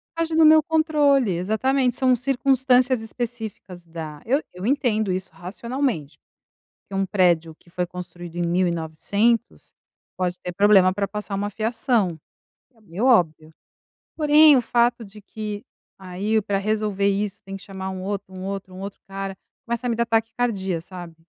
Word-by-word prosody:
Foge 330 -1 -1
do 320 - +6
meu 310 0 +8
controle, 295 - +2
exatamente. 245 +8 +1
São 255 -1 +3
circunstâncias 255 -1 +2
específicas 220 -6 -6
da 160 -3 -8
eu 275 +6 +2
eu 180 +2 -7
entendo 230 -6 +1
isso, 185 0 -3
racionalmente, 210 - -4 0.7
que 195 - -9
um 195 0 +1
prédio 175 -5 +2
que - - -25
foi 180 +1 -2
construído 175 -1 -9
em 175 - -1
1900, 175 +6 0 0.4
pode 180 -1 -2
ter 180 - -5
problema 195 -1 +5
pra 200 0 -1
passar 210 0 -5
uma 205 +1 -2
fiação. 225 - 0 0.6
É 225 - -26
meio 205 +3 -3
óbvio. 160 -9 +2 0.6
Porém 300 -1 +6
o - - +2
fato 240 0 +1
de 210 +1 -13
que, 210 0 -6 0.4
aí 195 +4 -1
pra 200 -1 -1
resolver 210 -1 0
isso 200 0 -1
tem 195 0 -7
que 195 - -15
chamar 190 -1 -6
um 190 -1 -6
outro, 200 -1 -5
um 185 0 -7
outro, 195 -1 -5
um 185 - -9
outro 195 +1 -7
cara, 195 0 -5 0.3
começa 235 +1 -2
a - - 0
me 235 - 0
dar 235 +1 +1
taquicardia, 225 -5 -1
sabe, 175 -1 -10
205 Hz, 160 wpm, -23 LUFS, 185-240 Hz, 0.7 s, meu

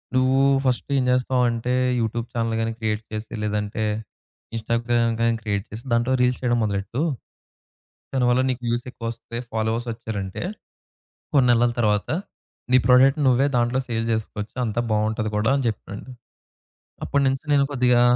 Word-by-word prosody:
నువ్వు 130 +1 +3 0.3
ఫస్ట్ 125 -1 0
ఏం 130 - +2
జేస్తావంటే 125 -1 +1 0.3
YouTube 115 +1 -2
channel 115 -1 -1
గాని 115 0 -1
క్రియేట్ 110 0 -1
చేసి 110 +2 -5
లేదంటే 105 +1 -2 0.7
ఇన్‌‌స్టాగ్రామ్ 115 0 +1
గాని 115 0 +3
క్రియేట్ 100 -1 -1
చేసి, 110 +2 -8
దాంట్లో 120 +3 +2
రీల్స్ 125 0 +2
చేయడం 120 -2 +1
మొదలెట్టు. 100 +5 -2 1.1
దానివల్ల 125 -1 +3
నీకు 125 -1 -2
వ్యూస్ 120 +1 -1
ఎక్కువ 115 - -9
వస్తే, 115 0 -8 0.2
ఫాలోవర్స్ 110 +2 -1
వచ్చారంటే, 105 - -5 0.9
కొన్ని 130 -3 +5
నెలల 120 0 +3
తరువాత 105 -2 +1 0.6
నీ 130 - +8
ప్రొడక్ట్‌ని 135 +4 +5
నువ్వే 130 +2 +4
దాంట్లో 120 +2 +1
సేల్ 115 -1 -1
జేసుకోవచ్చు. 110 0 -4
అంతా 110 +1 -1
బావుంటది 110 0 0
కూడా 110 +5 +2
అని 135 - -2
చెప్పాడు. 105 -1 -6 1.0
అప్పటినుంచి 135 0 +1
నేను 140 -1 +5
కొద్దిగా 125 -2 +3
115 Hz, 140 wpm, -23 LUFS, 110-125 Hz, 1.1 s, నీ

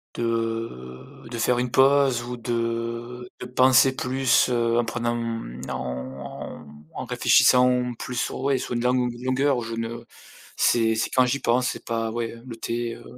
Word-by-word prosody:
de 115 - -4
de 120 - -4
faire 125 +1 +2
une 125 -1 -1
pause 135 -2 +4
ou 125 0 -6
de 115 +1 -3
de - - -6
penser 130 +1 +4
plus, 130 -1 +2
heu, 120 -1 +1
en 120 - +2
prenant, 120 +1 -2
mmh, 115 - -5
en 65 +3 -6 0.3
en 130 - -5
réfléchissant 125 0 +4
plus 125 - -6
sur - - -2
ouais, 135 -1 +1
sur 125 - -4
une 120 - -1
langue 125 +1 +2
ou 125 0 0
une 120 +1 -11
longueur 130 0 +1
je 115 0 -6
ne 115 +1 -5 0.5
c'est 115 -1 +3
c'est 110 - -1
quand 130 -1 +3
j'y 135 +3 0
pense, 125 +1 +1
c'est - - -6
pas 115 -1 -2
ouais, 115 0 -3
heu, 115 +1 -13
le 120 -3 -7
thé, 115 0 -3
heu, - - -14
120 Hz, 180 wpm, -24 LUFS, 115-125 Hz, 0.5 s, pause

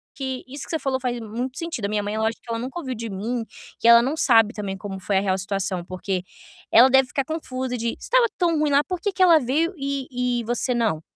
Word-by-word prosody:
que 265 -2 -4
isso 275 +1 -5
que - - -7
você 320 - -1
falou 265 -2 -1
faz 250 -2 -2
muito 240 +4 -5
sentido. 330 -11 -3
A - - +1
minha 210 0 -1
mãe 205 +1 -3
é - - -2
lógico 220 +1 -1
que - - -17
ela 230 - -2
nunca 255 +7 -6
ouviu 265 -6 -4
de 230 -1 -6
mim, 225 +4 -3 0.3
que - - +1
ela 235 0 +9
não 275 +6 -2
sabe 225 -6 +5
também 200 -3 -4
como 195 0 -7
foi 190 +1 0
a - - +3
real 190 -1 0
situação, 190 -2 -2
porque 185 0 -3 0.5
ela 245 +3 +7
deve 265 0 +4
ficar 275 - -1
confusa 260 -4 -4
de: 235 0 -1
"Se - - -9
estava - - +4
tão 335 -3 +1
ruim 300 -1 +2
lá, 285 +1 +4
por 365 +1 -4
que 400 +3 -2
que 370 0 +2
ela 335 -3 +7
veio 305 +7 0
e 255 -3 -2
e - - -7
você 240 +2 +1
não?" 220 -10 0
245 Hz, 265 wpm, -23 LUFS, 215-275 Hz, 0.5 s, ela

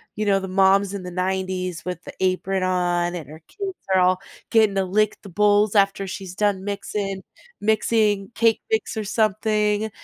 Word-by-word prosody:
you 215 - -2
know, 195 -1 +4
the 190 - -5
moms 195 +1 +3
in 200 - -4
the 180 - -6
'90s 185 -1 -2
with 180 -1 -5
the - - -9
apron 190 +1 0
on 175 -1 0
and 160 -6 -6
her 155 +2 -11
kids 395 -3 -6 0.2
are 185 - +5
all 185 +1 +3 0.3
getting 215 -3 +4
to 195 - +2
lick 210 +3 +1
the 200 - -10
bowls 205 +2 +3
after 195 -1 +3
she's 190 -1 -7
done 205 -2 0
mixing 200 -1 -4 0.4
mixing 215 -2 +1
cake 230 -1 +3
mix 220 +1 0
or 220 - -2
something. 215 0 +1
195 Hz, 180 wpm, -23 LUFS, 185-210 Hz, 0.4 s, are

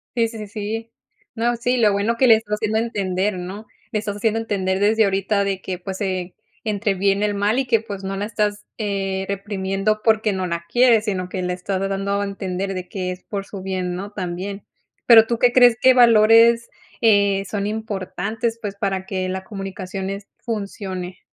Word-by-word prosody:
Sí, 230 -1 +2
sí, 225 0 -9
sí, 210 - -6
sí. 220 +2 -5 0.4
No, 235 +1 +1
sí, 245 +2 0
lo 215 -4 +4
bueno 215 +4 0
que 260 - +4
le 225 - +8
estás 210 -1 -2
haciendo 220 0 0
entender, 195 -3 -1
¿no? 190 +5 -7 0.3
Le 215 - +1
estás 205 -1 -4
haciendo 220 +1 +1
entender 190 -3 -1
desde 220 +1 +4
ahorita 200 +1 +1
de 195 -1 -2
que, 185 -1 -4
pues, 190 +2 -6
eh, 185 -2 -2 0.3
entre 210 -1 0
bien 195 +1 +1
y - - +3
el 205 - 0
mal 205 +5 +1
y 270 - 0
que, 235 -3 +3
pues, 205 -3 -7
no 195 0 -3
la 205 - -2
estás, 210 -1 -2
eh, 195 -2 -2
reprimiendo 200 +1 -1
porque 220 -2 +3
no 185 -1 -2
la 170 0 -3
quieres, 240 +1 +4
sino 185 -3 -2
que 185 - -3
la 180 0 -1
estás 185 +1 -3
dando 195 +1 -1
a 205 - -1
entender 195 -1 -3
de 185 -1 -6
que 185 -2 -3
es 180 - -8
por 200 -2 -5
su 195 -2 -8
bien, 185 -2 -3
¿no? 200 +3 -6
También, 190 +1 -5 0.4
pero, 225 -2 +8
¿tú 235 0 -1
qué 245 0 +4
crees 245 -2 +6
que 260 0 +7
valores, 230 -1 +6 0.3
eh, 200 -3 +3
son 200 -1 -2
importantes, 220 +2 -3
pues, 205 -2 -4
para 195 -2 -2
que 185 -1 -3
la 190 0 -4
comunicación, 195 -1 -5
es 200 0 -6 0.2
funcione? 195 -5 -5
200 Hz, 200 wpm, -21 LUFS, 190-220 Hz, 0.4 s, le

